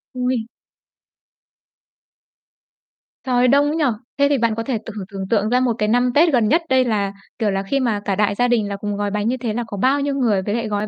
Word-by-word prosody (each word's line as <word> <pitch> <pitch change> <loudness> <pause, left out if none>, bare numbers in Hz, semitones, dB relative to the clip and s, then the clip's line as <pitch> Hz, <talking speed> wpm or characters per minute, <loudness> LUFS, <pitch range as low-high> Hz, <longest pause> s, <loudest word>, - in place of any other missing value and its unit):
Ôi! 250 -2 -1 2.8
Trời 250 -1 +2
đông 280 +3 +4
ấy 300 - -1
nhỉ. 320 -2 +1 0.3
Thế 280 - +5
thì 285 - +2
bạn 230 -2 +1
có 230 - -3
thể 245 0 -2
t - - -10
thử 200 - -5
tưởng 195 -1 -5
tượng 215 -1 +1
ra 250 +2 +3
một 250 -2 +1
cái 210 -1 0
năm 245 +2 +2
Tết 320 +1 +4
gần 235 -4 +3
nhất 320 +10 +3
đây 260 -1 +3
là, 205 -4 -1 0.3
kiểu 215 -3 +1
là, 195 0 -1
khi 275 +8 -1
mà 230 -5 0
cả 195 - 0
đại 205 0 +1
gia 245 +3 +2
đình 230 -4 +1
là 200 - -3
cùng 205 +1 -4
gói 205 0 -2
bánh 210 +1 -1
như 255 +2 0
thế 230 -3 -3
là 240 - -2
có 205 - -6
bao 265 +7 +2
nhiêu 280 -1 -1
người, 225 -8 +1
với 205 +3 -2
lại 230 -2 -2
gói 210 0 -2
230 Hz, 250 wpm, -20 LUFS, 205-255 Hz, 2.8 s, Thế